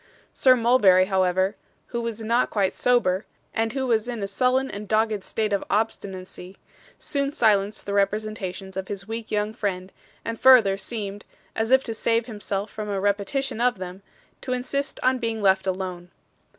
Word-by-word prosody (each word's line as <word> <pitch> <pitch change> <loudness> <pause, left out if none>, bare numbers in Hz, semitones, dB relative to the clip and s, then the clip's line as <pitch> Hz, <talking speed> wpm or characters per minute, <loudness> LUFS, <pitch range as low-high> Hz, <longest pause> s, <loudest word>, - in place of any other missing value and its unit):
Sir 255 -1 +5
Mulberry, 225 -6 +5
however, 190 +1 +1 0.3
who 235 - -2
was 230 -1 -4
not 235 +3 +2
quite 195 -3 0
sober, 220 -6 +2 0.3
and 225 0 0
who 270 -1 -1
was 230 -2 +1
in 235 -4 -4
a - - -1
sullen 255 +6 +1
and 205 +1 -7
dogged 215 -1 +1
state 215 0 -2
of 200 - 0
obstinacy, 190 -3 -3 0.4
soon 280 -1 -2
silenced 210 -5 +2
the 200 - -3
representations 195 -2 -2
of 190 -1 -4
his 200 0 -6
weak 225 0 -5
young 210 0 -1
friend, 190 -4 -3 0.3
and 230 0 -4
further 240 -7 +7
seemed 205 -1 -5 0.3
as 220 0 -1
if 265 +1 +5
to 230 - -4
save 230 +1 +1
himself 205 -3 -4
from 215 -1 -5
a 200 -1 -1
repetition 205 +6 -1
of 245 -3 +2
them 185 +1 -7 0.4
to 255 - -3
insist 275 +3 -3
on 255 0 +3
being 225 -2 -2
left 190 -1 +3
alone. 185 -2 -3
210 Hz, 170 wpm, -24 LUFS, 195-235 Hz, 0.4 s, further